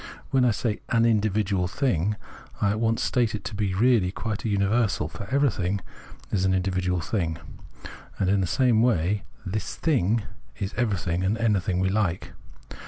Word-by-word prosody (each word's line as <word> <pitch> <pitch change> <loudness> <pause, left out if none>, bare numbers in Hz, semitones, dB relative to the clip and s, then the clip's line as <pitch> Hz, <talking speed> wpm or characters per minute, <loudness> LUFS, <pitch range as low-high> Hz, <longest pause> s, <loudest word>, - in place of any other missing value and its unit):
When 130 -2 +4
I - - +5
say 110 0 -1
"an 115 0 +3
individual 105 -4 +1
thing," 105 - 0 0.4
I 100 - +2
at 105 - -2
once 115 0 +1
state 120 -3 +1
it 105 - -6
to - - -5
be 100 -2 -1
really 110 -4 +3
quite 105 +1 -4
a 115 - -1
universal, 100 -4 +1
for 100 +5 -8
everything 115 -9 +1 0.5
is 95 -3 +1
an 95 0 +3
individual 90 -1 0
thing: 80 -4 -1 0.8
and 95 - 0
in 100 +1 +3
the 90 - 0
same 120 +2 +3
way 105 -4 +1
" - - -28
this 110 - -3
thing 115 - +1 0.2
" - - -29
is 100 +1 -3
everything 95 -7 0
and 100 +4 +1
anything 100 -5 +1
we 95 0 +2
like. 95 -4 -1
100 Hz, 175 wpm, -26 LUFS, 95-115 Hz, 0.8 s, I